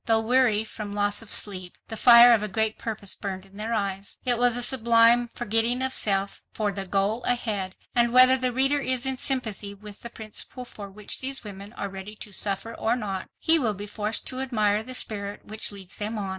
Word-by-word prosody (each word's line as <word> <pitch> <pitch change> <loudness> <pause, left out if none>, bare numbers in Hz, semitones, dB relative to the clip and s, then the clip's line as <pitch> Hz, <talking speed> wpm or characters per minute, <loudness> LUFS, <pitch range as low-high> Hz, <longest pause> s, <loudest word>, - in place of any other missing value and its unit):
Though 225 -1 +3
weary 230 -2 +2
from 210 -2 -7
loss 205 +1 +1
of 225 - -11
sleep, 185 -4 0
the 225 - -6
fire 240 +1 +8
of 225 - +2
a 210 - -2
great 220 +2 -1
purpose 215 -3 -3
burned 190 -2 -6
in 195 +1 -18
their 220 +2 -4
eyes.... 200 -3 -3
"It 245 -2 +2
was 245 -1 +3
a 245 - +2
sublime 235 -1 +4
forgetting 230 +4 0
of 265 0 -1
self 195 -1 0
for 210 -2 -2
the 195 -1 -5
goal 200 +5 0
ahead, 210 -6 -1 0.2
and 235 -1 +2
whether 255 +1 +7
the 255 -1 -1
reader 270 +3 +2
is 255 -2 -1
in 265 -1 -2
sympathy 220 -6 -2
with 210 0 -12
the 235 - -7
principle 225 +3 -8
for 205 -4 -10
which 205 +1 -4
these 270 0 -1
women 200 -1 -9
are 200 - -5
ready 195 +2 -9
to 210 - -10
suffer 200 +3 +1
or 225 - -1
not, 195 -6 -5
he 325 0 +5
will 220 -7 -1
be 205 +2 -6
forced 210 +1 -3
to 255 - -2
admire 215 -5 0
the 255 +3 -7
spirit 205 -3 -4
which 215 0 -3
leads 195 -2 -11
them 215 +2 -3
on." 200 -2 -4
215 Hz, 215 wpm, -25 LUFS, 200-240 Hz, 0.2 s, fire